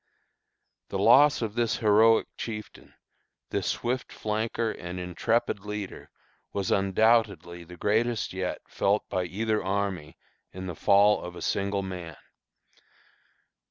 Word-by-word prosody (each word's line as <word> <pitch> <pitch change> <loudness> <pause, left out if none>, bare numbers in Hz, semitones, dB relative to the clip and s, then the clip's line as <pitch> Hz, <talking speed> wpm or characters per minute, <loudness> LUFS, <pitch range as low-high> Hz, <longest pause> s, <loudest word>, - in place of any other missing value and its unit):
'" - - -53
The - - -3
loss 145 -2 +5
of 110 -2 -3
this 115 -1 0
heroic 110 +1 +5
chieftain, 110 -2 -8 0.6
this - - -1
swift 125 +2 -2
flanker 110 +1 -2
and 90 -2 -7
intrepid 110 +6 0
leader, 105 0 -7 0.4
was 100 -2 -2
undoubtedly 100 -3 +2
the 90 +1 -12
greatest 110 +3 0
yet 95 -1 -3
felt 100 +2 0
by 90 -1 -1
either 110 +4 -1
army 95 -5 -2 0.3
in 95 0 -7
the 90 - -4
fall 100 +5 +4
of 90 0 -7
a - - -9
single 100 0 -1
man. 90 -5 -7
100 Hz, 125 wpm, -27 LUFS, 95-110 Hz, 0.6 s, loss